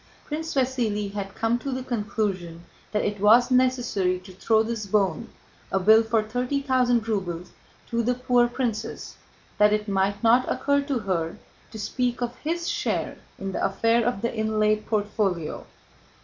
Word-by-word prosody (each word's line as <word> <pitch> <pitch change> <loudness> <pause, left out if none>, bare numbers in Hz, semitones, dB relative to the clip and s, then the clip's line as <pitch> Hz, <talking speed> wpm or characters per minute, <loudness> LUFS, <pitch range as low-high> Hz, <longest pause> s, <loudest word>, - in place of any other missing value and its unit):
Prince 320 +1 -4
Vasíli 230 -6 0
had 195 -1 -5
come 230 +1 +1
to 275 - -4
the 255 0 -3
conclusion 200 -8 -3 0.3
that 210 - 0
it 205 -1 -2
was 230 +5 +5
necessary 245 -8 +2
to 185 0 -13
throw 220 +4 +2
this 225 -2 -4
bone—a 195 0 -2
bill 220 +4 +6
for 225 -1 +1
thirty 250 +5 -1
thousand 250 -4 +2
rubles—to 190 +3 -4
the 245 +2 +1
poor 245 -1 +3
princess 240 -3 -4 0.4
that 210 0 +5
it 210 0 -1
might 200 +2 0
not 240 +3 +4
occur 285 +2 +1
to 280 -2 -2
her 180 -7 -2 0.3
to - - -9
speak 245 +3 -1
of 240 0 -3
his 335 +4 -3
share 410 0 -2 0.2
in 195 0 -4
the - - -3
affair 230 +4 +2
of 235 -3 -1
the 235 - -1
inlaid 215 -1 +1
portfolio. 205 -6 -1
220 Hz, 155 wpm, -25 LUFS, 205-250 Hz, 0.4 s, bill